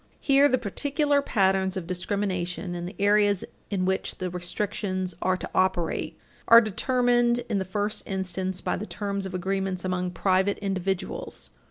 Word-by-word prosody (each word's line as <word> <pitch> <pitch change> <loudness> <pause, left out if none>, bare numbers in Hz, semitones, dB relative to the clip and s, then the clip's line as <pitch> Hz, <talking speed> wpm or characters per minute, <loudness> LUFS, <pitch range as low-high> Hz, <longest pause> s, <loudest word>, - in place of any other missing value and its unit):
13 - - -34
Here, 280 +1 +5
the 255 - +3
particular 285 +6 0
patterns 190 -6 +1
of 180 - -4
discrimination 180 -1 -2
and 175 0 -4
the 195 - -13
areas 205 -1 +3 0.3
in 190 -3 0
which 190 0 -1
the 185 -1 -3
restrictions 185 0 -3
are 185 0 +2
to - - -5
operate 175 -3 0 0.3
are 230 - +10
determined, 240 +2 +2
in 210 -4 0
the - - 0
first 205 +3 -2
instance, 190 -1 -3
by - - -1
the - - -5
terms 200 +1 -3
of 185 - -6
agreements 190 0 -2
among 180 -1 -1
private 190 +2 +1
individuals. 195 -2 -3
190 Hz, 160 wpm, -26 LUFS, 185-210 Hz, 0.3 s, are